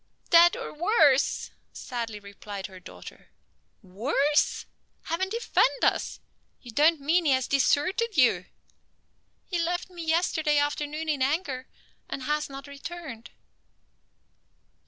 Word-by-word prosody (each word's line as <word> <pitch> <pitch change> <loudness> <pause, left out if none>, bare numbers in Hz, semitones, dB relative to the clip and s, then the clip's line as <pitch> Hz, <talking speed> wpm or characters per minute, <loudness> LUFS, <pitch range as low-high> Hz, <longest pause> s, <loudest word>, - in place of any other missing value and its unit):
"Dead, 345 +6 +7
or 485 - -6
worse," 305 - +3 0.2
sadly 230 -4 -5
replied 200 -1 -8
her 190 -2 -10
daughter. - - -12 0.5
"Worse? 270 +10 0 0.4
Heaven 365 +4 -2
defend 470 +3 +1
us! - - +1 0.4
You 240 - -11
don't 305 +6 +4
mean 325 +5 +1
he 280 - +4
has 260 -1 0
deserted 365 - +1
you?" 210 -9 +3 1.0
"He 350 -3 -3
left 350 +2 -2
me 345 -2 -7
yesterday 320 -2 +1
afternoon 295 +2 -1
in 295 -4 -1
anger, 270 -2 -1 0.4
and 270 - -5
has 300 +2 -1
not 275 0 -9
returned." 280 -4 -8
295 Hz, 115 wpm, -27 LUFS, 260-335 Hz, 1.0 s, Dead